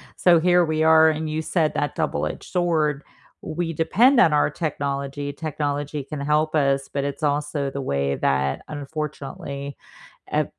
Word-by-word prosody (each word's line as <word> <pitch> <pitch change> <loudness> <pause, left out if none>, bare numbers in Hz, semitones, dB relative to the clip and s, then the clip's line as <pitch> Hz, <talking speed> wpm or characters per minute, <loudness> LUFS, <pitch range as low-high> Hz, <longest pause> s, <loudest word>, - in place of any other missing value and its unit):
So 175 -2 +5
here 175 +1 +4
we 155 0 -1
are, 160 0 +6
and 155 0 -3
you 155 +1 -2
said 160 -2 0
that 145 - -1
double-edged 155 -2 -3
sword, 160 -5 +1 0.4
we 165 0 -3
depend 235 - +4
on 160 -9 +5
our 150 - +3
technology. 140 -2 -3
Technology 145 -2 -3
can 145 +2 -7
help 150 +2 +1
us, 140 -2 +1
but 140 - -2
it's 140 +1 -4
also 145 -1 0
the 140 0 -5
way 70 - -1
that 70 0 0
unfortunately, 140 -1 -6 0.5
uh, - - +1
150 Hz, 155 wpm, -23 LUFS, 140-160 Hz, 0.5 s, are